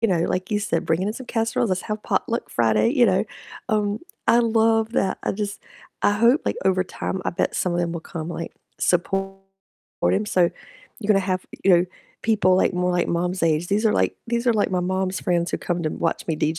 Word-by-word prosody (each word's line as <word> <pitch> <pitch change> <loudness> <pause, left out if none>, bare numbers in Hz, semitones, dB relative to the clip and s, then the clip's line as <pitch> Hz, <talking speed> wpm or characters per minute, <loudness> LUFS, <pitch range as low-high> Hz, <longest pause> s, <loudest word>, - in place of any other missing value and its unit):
you 230 - +2
know, 175 -4 +2
like 185 +2 -2
you 210 - +2
said, 200 -5 -1
bringing 170 +4 0
in 215 - -3
some 260 - -8
casseroles, 225 -1 0
let's 185 - 0
have 215 0 -4
potluck 230 +1 -1
Friday, 115 - +3
you 250 -3 +4
know? 190 +2 +2 0.5
Um, 210 -1 0 0.3
I 235 - +6
love 225 -1 +2
that. 190 - +1
I - - -1
just, 200 0 -4 0.4
I 205 - +4
hope 235 +7 +4
like - - -1
over 185 -1 +2
time 185 +1 -4
I - - 0
bet 175 - -1
some 180 - 0
of 175 - -1
them 170 -1 -1
will 170 - -4
come, 160 0 -6
like 165 0 -5 0.3
support 195 +2 0 0.8
him, 210 +2 0
so 180 -4 +3 0.5
you're 210 - -5
gonna 195 -2 +5
have, 185 -1 -2 0.2
you 195 - +5
know, 175 +1 +3 0.4
people 205 -5 +3
like 185 - +2
more 180 0 +1
like 175 -1 +1
Mom's 175 +1 -1
age. 165 +1 +1
"These 210 +3 +2
are 215 - +3
like - - +1
these 235 +1 -1
are 240 - +5
like 205 - +1
my 180 - +1
mom's 185 +1 -1
friends 175 0 0
who - - +1
come 175 -1 -2
to - - +2
watch 165 - -2
me 160 - -1
DJ." 155 +1 0
190 Hz, 230 wpm, -23 LUFS, 175-215 Hz, 0.8 s, I